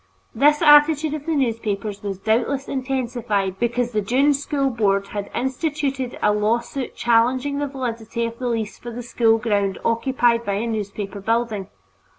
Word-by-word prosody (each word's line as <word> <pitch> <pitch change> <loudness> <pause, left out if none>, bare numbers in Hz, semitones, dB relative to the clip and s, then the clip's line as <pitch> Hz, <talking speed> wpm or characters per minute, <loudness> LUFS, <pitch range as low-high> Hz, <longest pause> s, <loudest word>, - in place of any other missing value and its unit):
This 295 +6 +3
attitude 295 0 +6
of 305 0 -6
the 325 - +1
newspapers 215 -6 -2
was 200 -2 -4
doubtless 235 +7 0
intensified 240 -7 -2
because 240 0 0
the 215 -2 0
Dunne 265 +8 +3
School 280 -1 -1
Board 200 -4 +1
had 205 -1 -5
instituted 270 -1 -2
a 210 - +4
lawsuit 235 +5 -1
challenging 255 +4 +2
the 290 - -1
validity 235 -4 -3
of 230 0 -6
the 250 - -2
lease 225 -3 -2
for 240 - -8
the 240 +1 -6
school 225 -1 +2
ground 205 -3 0
occupied 235 0 +2
by 200 - -2
a 210 +4 -1
newspaper 205 -3 -4
building. 220 -2 -1
235 Hz, 160 wpm, -22 LUFS, 215-270 Hz, -, attitude